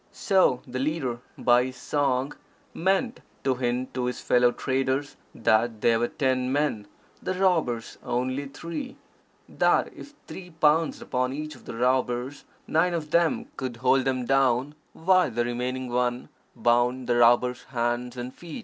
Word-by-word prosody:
So 185 - +2
the 130 0 -5
leader 135 -4 -2 0.2
by 125 0 +4
his 130 0 -6
song 135 +1 -1 0.4
meant 195 +7 0 0.2
to 135 - +2
hint 125 0 -2
to 125 -1 -2
his 125 -1 -3
fellow 125 0 +3
traders 135 +3 -1 0.2
that 110 0 +2
they 115 - +4
were 120 +1 +1
ten 130 -2 0
men, 140 -8 0 0.3
the 185 - -2
robbers 165 -12 0
only 130 +3 -2
three, 170 - -7 0.5
that - - +1
if 290 - -12
three 180 -1 -9
pounced 155 +1 +2
upon 125 +1 -1
each 155 +2 -5
of 130 - -16
the - - -7
robbers, 125 +2 0 0.2
nine 170 +2 +2
of 155 -2 -5
them 170 -1 +2
could 130 -3 -4
hold 130 +1 +2
them 130 -2 0
down, 135 +1 +2 0.2
while 185 -1 +3
the 120 0 -1
remaining 125 +2 -3
one 125 0 -1 0.3
bound 120 +2 +2
the 120 0 +1
robbers' 120 +1 +3
hands 120 0 -2
and 125 +1 -5
feet. 170 +2 -9
130 Hz, 155 wpm, -26 LUFS, 120-150 Hz, 0.5 s, by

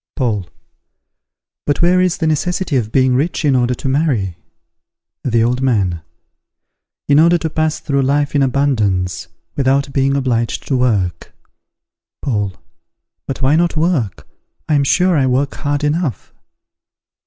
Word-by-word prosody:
Paul. 105 - -1 1.2
But 145 +3 +1
where 180 +1 +4
is 185 0 +1
the 165 - -2
necessity 170 +1 -1
of 110 -4 0
being 130 0 +3
rich 150 +5 0
in 140 -3 +3
order 125 0 +1
to 135 - -5
marry? 130 - 0 0.9
The 115 -3 +2
Old 125 +2 0
Man. 100 -10 0 1.1
In 145 +1 +5
order 170 +2 +5
to 160 -2 -4
pass 155 0 0
through 140 -3 0
life 145 +2 +1
in 145 - +2
abundance, 110 -11 0 0.3
without 140 0 +1
being 135 0 +1
obliged 120 -4 -1
to 135 - +2
work. 105 -8 -1 0.9
Paul. 105 -7 -1 0.7
But 135 0 -4
why 135 +3 +4
not 170 0 +1
work? 155 - -1 0.4
I - - +1
am 145 -1 +3
sure 180 +5 +2
I 135 -3 +2
work 135 +2 0
hard 145 0 -2
enough. 150 - -2
135 Hz, 145 wpm, -17 LUFS, 120-150 Hz, 1.2 s, In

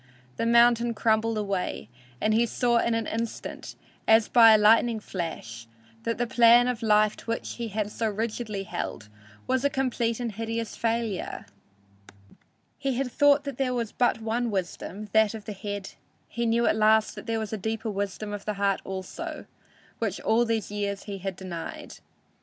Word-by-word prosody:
The 230 - 0
mountain 235 0 +4
crumbled 220 0 +1
away, 195 - -2 0.3
and 215 - +1
he 235 +2 +3
saw 240 0 +2
in 230 0 +1
an 225 -1 -1
instant, 230 +1 -5 0.3
as 220 0 +5
by 225 -2 +8
a - - +6
lightning 225 +2 +4
flash, 120 - -6 0.4
that 230 - -1
the 240 - 0
plan 240 0 +6
of 250 -2 -2
life 215 -1 +3
to - - -13
which 230 0 -4
he 235 -1 -3
had 210 0 -3
so 225 0 -1
rigidly 215 -1 -3
held 175 - -5 0.4
was 260 0 0
a 285 - +3
complete 245 -4 -1
and 240 -2 -2
hideous 225 +1 -4
failure. 230 -4 -2 1.3
He 270 -2 -1
had 255 0 -2
thought 290 +1 +4
there 270 -2 -2
was 230 -3 -2
but 245 -2 +1
one 235 +2 -1
wisdom, 200 +1 -4
that 220 0 +4
of 215 -2 -9
the 210 - -5
head; 205 0 -6 0.4
he 235 0 -2
knew 235 +1 +2
at - - +3
last 220 0 +3
that - - -10
there 225 0 0
was 220 -1 -4
a - - +1
deeper 220 +2 -3
wisdom 205 +1 -4
of 205 -1 -6
the 210 - -2
heart 200 -1 +1
also, 190 -1 -6 0.5
which 220 -5 -2
all 230 +2 +3
these 225 -3 -2
years 200 -1 -3
he 200 -2 -6
had 190 0 -4
denied! 175 -3 -7
220 Hz, 175 wpm, -27 LUFS, 205-235 Hz, 1.3 s, by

